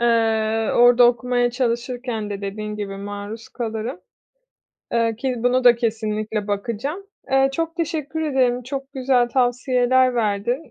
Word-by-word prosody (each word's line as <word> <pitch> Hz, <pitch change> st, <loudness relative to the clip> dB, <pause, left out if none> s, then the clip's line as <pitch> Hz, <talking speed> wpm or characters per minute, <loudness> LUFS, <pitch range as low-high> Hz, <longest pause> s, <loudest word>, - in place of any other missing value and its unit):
Eee, 225 Hz, -1 st, +2 dB
orada 245 Hz, 0 st, +7 dB
okumaya 245 Hz, 0 st, +1 dB
çalışırken 240 Hz, -2 st, -2 dB
de 200 Hz, -, -4 dB
dediğin 210 Hz, +1 st, -5 dB
gibi, 195 Hz, -2 st, -5 dB
maruz 205 Hz, +2 st, -7 dB
kalırım. 230 Hz, +6 st, -4 dB, 0.9 s
Eee, 230 Hz, -1 st, +1 dB
ki 255 Hz, +2 st, -2 dB
bunu 245 Hz, +2 st, +1 dB
da 245 Hz, -1 st, +7 dB
kesinlikle 215 Hz, -2 st, -2 dB
bakacağım. 235 Hz, -, -3 dB, 0.2 s
Eee, 270 Hz, 0 st, +4 dB
çok 330 Hz, +3 st, -3 dB
teşekkür 320 Hz, -2 st, -3 dB
ederim, 255 Hz, -4 st, +1 dB
çok 270 Hz, +2 st, -6 dB
güzel 255 Hz, -2 st, +2 dB
tavsiyeler 255 Hz, 0 st, +2 dB
verdin. 235 Hz, +6 st, -1 dB
240 Hz, 130 wpm, -22 LUFS, 220-260 Hz, 0.9 s, orada